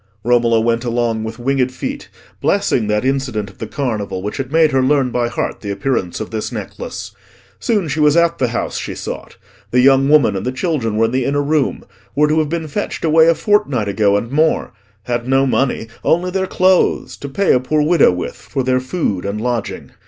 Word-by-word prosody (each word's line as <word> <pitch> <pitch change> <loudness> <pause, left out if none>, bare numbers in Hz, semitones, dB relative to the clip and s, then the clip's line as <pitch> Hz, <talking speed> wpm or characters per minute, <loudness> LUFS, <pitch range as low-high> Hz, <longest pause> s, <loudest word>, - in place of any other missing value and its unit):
Romola 120 -1 +3
went 115 +1 0
along 120 -2 -1
with 110 0 -6
winged 130 +1 0
feet, 270 - -6 0.3
blessing 200 - +1
that 105 +3 0
incident 125 -7 -1
of 95 - -25
the 110 - -5
Carnival 105 -6 -3
which 105 - -4
had 135 -1 -4
made 160 -1 +4
her 135 -1 +2
learn 130 -1 +2
by 120 0 0
heart - - -3
the 105 - -6
appearance 100 -3 -2
of - - -6
this 110 -1 -3
necklace. - - -6 0.5
Soon 210 -7 0
she 155 +2 -2
was 150 +1 +4
at 170 0 +2
the 130 - +2
house 120 - -3
she - - -5
sought. - - -7 0.3
The 125 - +2
young 135 +1 +5
woman 145 -9 +4
and 95 - -3
the 125 - -1
children 130 - -1
were 115 - +4
in 115 - -1
the 130 0 0
inner 145 +1 0
room—were 150 0 -1
to 155 +1 +2
have 155 -2 0
been 165 -1 -3
fetched 150 - -3
away 160 0 +5
a 165 - +5
fortnight 160 - +1
ago 100 0 +2
and 115 +4 -4
more—had 120 -6 -2
no 135 +1 +3
money, 130 -3 0 0.2
only 180 +2 +1
their 190 0 -1
clothes, 185 0 +2
to 140 - -7
pay 195 +9 +2
a 125 - +3
poor 150 +4 0
widow 160 - +4
with 90 0 -4
for 135 -2 -4
their 130 0 +2
food 130 - -2
and 100 +2 -3
lodging. 120 -1 -3
130 Hz, 205 wpm, -18 LUFS, 115-150 Hz, 0.5 s, young